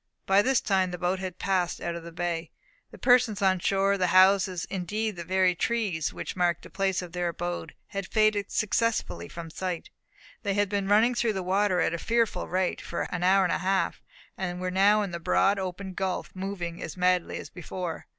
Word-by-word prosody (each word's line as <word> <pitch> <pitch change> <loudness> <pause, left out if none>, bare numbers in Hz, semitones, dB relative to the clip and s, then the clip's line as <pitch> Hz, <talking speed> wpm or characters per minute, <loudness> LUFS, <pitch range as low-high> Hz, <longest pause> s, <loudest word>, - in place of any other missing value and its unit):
By 195 +1 +5
this 260 +4 +2
time 190 -2 +1
the 180 - -5
boat 180 +2 0
had 185 -2 -5
passed 185 -3 0
out 170 - -3
of 170 - -6
the 170 +1 -9
bay. 170 -1 -3 0.4
The - - -13
persons 245 -4 +4
on 190 -1 +3
shore, 195 +2 +1
the 180 - +2
houses, 185 0 +4
indeed 205 +3 -3
the 170 - -6
very 185 +1 +2
trees 195 -5 -1
which - - -6
marked 175 -2 +1
the - - -12
place 190 -1 0
of 175 - -9
their 175 0 -1
abode, 175 +1 -4
had 195 -1 -4
faded 215 -2 +2
successively 210 - 0
from 165 -1 -8
sight. 180 0 -4 0.5
They 200 -3 -1
had 205 -1 +1
been 200 -1 -1
running 220 +5 +4
through 235 -2 +1
the 190 -2 -3
water 190 0 +2
at - - +1
a 170 - -3
fearful 230 -4 0
rate, 185 0 -1
for 170 - -3
an 180 - -2
hour 190 +2 +4
and 180 - +1
a 155 - 0
half, 190 +2 0 0.4
and 180 -2 -3
were 185 0 -2
now 205 +3 +4
in 195 - -4
the 170 - -4
broad 195 +4 +2
open 190 +1 -5
gulf, 190 0 -3
moving 185 -3 -5
as - - -6
madly 180 -1 +1
as - - -8
before. 175 -1 -6
185 Hz, 210 wpm, -27 LUFS, 175-200 Hz, 0.5 s, By